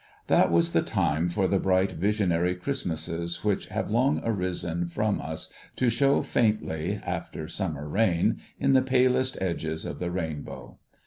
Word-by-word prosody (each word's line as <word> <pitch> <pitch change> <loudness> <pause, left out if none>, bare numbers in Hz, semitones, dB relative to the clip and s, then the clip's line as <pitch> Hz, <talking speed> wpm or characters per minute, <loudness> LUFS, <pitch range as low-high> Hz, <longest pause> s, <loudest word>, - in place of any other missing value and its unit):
That - - +4
was 85 0 +3
the - - +4
time 80 +4 0
for 95 +2 +1
the 95 +1 +2
bright 95 +1 +2
visionary 90 -2 +1
Christmases 85 - -3
which 105 -2 0
have 110 0 -3
long 130 +6 +3
arisen 90 -5 -1
from 105 +4 -1
us 80 0 -5 0.2
to 125 -2 +2
show 140 +4 +3
faintly, 105 -9 0
after 80 - -4
summer 80 -5 -3
rain, 90 0 +1 0.2
in - - +3
the 130 - +6
palest 130 0 +2
edges 80 -3 -2
of - - -5
the 90 - -2
rainbow 80 -5 -5
90 Hz, 150 wpm, -27 LUFS, 85-110 Hz, 0.2 s, the